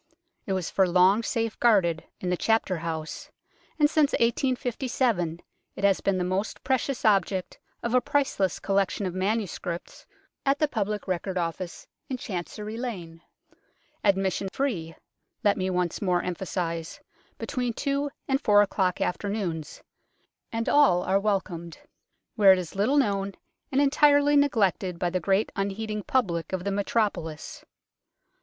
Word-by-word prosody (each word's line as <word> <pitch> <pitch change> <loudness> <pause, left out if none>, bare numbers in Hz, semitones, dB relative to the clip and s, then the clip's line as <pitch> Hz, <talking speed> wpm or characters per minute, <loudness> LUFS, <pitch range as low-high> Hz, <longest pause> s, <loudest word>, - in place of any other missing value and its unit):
It 195 - 0
was 185 -3 -2
for 190 -1 +3
long 185 +4 +5
safe 230 -1 -2
guarded 185 -9 +3
in 180 - -2
the - - +2
Chapter 220 -2 +1
House, 160 -1 -5 0.5
and 300 -2 +5
since 300 -1 +2
1857 240 - 0 0.3
it - - -7
has 200 -1 +3
been 195 -1 +1
the 180 - 0
most 185 +4 -2
precious 260 0 -1
object 195 -3 +1 0.2
of 235 - -1
a 255 - +5
priceless 245 -12 0
collection 200 0 0
of 180 - -2
manuscripts 185 -3 -3 0.4
at 275 +1 +2
the 305 - +2
Public 210 -5 -2
Record 185 +1 -2
Office 175 +1 -4 0.2
in 260 - -2
Chancery 210 +2 -5
Lane 180 -10 -6 0.8
(admission 195 -1 +1
free, 180 -13 -2 0.5
let 205 -1 +4
me 185 0 -1
once 180 -2 -1
more 180 -3 +1
emphasize, 170 -2 -3 0.4
between 250 -2 -2
two 280 +4 -1 0.2
and 270 +1 +1
four 205 -1 +6
o'clock 190 -3 0
afternoons, 180 -5 -3 0.7
and 230 0 -2
all 185 -12 +5
are 195 +1 +2
welcomed) 185 -5 -2 0.6
where 200 -3 +7
it 190 - +6
is 180 -3 -5
little 215 +9 +2
known 200 -6 +1 0.4
and 270 - +2
entirely 290 0 +4
neglected 200 -10 +2
by 175 0 -1
the 185 - 0
great 195 +4 +1
unheeding 210 +2 -2
public 180 -9 0
of 185 -1 -2
the 200 - -1
metropolis. 195 -6 -2
195 Hz, 140 wpm, -27 LUFS, 180-230 Hz, 0.8 s, where